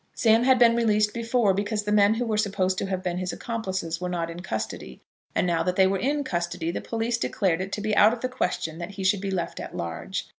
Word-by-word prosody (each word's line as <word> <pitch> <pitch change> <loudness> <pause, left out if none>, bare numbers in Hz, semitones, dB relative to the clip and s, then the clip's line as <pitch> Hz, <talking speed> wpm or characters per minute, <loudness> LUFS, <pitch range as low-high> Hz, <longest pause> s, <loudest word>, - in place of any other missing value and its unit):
Sam 225 0 +4
had 260 -1 +5
been 235 -1 +5
released 210 -2 +2
before 230 -3 +1
because 205 +2 -1
the 210 - -2
men 210 +1 +5
who 245 +2 -1
were 220 -2 -1
supposed 195 -3 0
to - - -2
have 185 -1 -3
been 180 -1 -2
his 185 -1 -2
accomplices 190 -7 -4
were 180 - -2
not 170 -2 -2
in 170 - -8
custody; 110 - -5 0.4
and - - +2
now 170 -2 +1
that 180 +2 0
they 190 - +5
were 190 0 +1
in 285 +3 0
custody 175 -6 -2
the - - -4
police 230 +1 -2
declared 185 -6 0
it 190 +1 -5
to 210 - -2
be 215 0 0
out 210 +2 +7
of 240 0 -5
the 255 - 0
question 180 -9 -2
that 170 - -5
he 195 -1 -7
should 190 0 +2
be 200 - -3
left 185 -3 -3
at - - -7
large. 85 -1 -4
195 Hz, 255 wpm, -25 LUFS, 180-225 Hz, 0.4 s, out